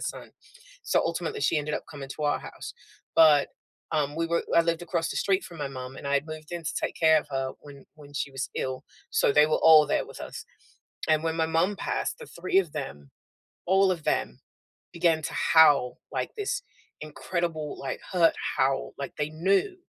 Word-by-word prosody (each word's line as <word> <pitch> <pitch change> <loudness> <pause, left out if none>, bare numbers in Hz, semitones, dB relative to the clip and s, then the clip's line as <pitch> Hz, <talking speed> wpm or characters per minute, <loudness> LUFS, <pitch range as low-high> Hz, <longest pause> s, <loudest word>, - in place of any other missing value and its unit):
son, - - -6 0.5
so, - - +2
ultimately, 435 - -2
she 160 - +2
ended 150 0 -2
up - - -4
coming 140 -3 -8
to 155 - -5
our 145 -1 +1
house, - - -9 0.4
but, 150 -3 +6 0.4
um, 150 -1 0
we 165 0 0
were 170 0 0
I 170 - +7
lived 165 0 0
across 165 -1 -2
the - - -4
street 195 -1 +1
from 170 -2 -11
my 145 -2 -3
mom, 130 -1 -8
and - - -8
I 140 - +1
had 140 +2 +1
moved 155 -1 -9
in 175 -1 -5
to 145 - -3
take - - -2
care 160 -1 +5
of - - -16
her 135 -1 -2
when 140 -2 -13
when 145 -2 -15
she 140 - -2
was 135 -1 -4
ill, 130 0 -3 0.3
so - - +3
they 150 +1 +6
were 155 - +2
all 155 -2 +8
there - - 0
with - - -11
us. - - -7 0.6
And 155 -1 +3
when 160 0 -1
my 160 -1 +1
mom 165 +5 +1
passed, - - -2
the 475 - -10
3 185 - -3
of 175 -6 0
them, 75 - -6 0.6
all 190 +1 +4
of 170 -4 -3
them 60 - -1 0.5
began 165 -2 +2
to - - -4
howl 145 -6 +5
like - - -2
this 475 +4 -2 0.4
incredible, 155 0 -3
like, 135 -1 -4
hurt 170 -3 +4 0.2
howl, 135 +1 +1
like 140 -2 -5
they 150 0 -2
knew 195 - +1
155 Hz, 205 wpm, -27 LUFS, 145-170 Hz, 0.6 s, all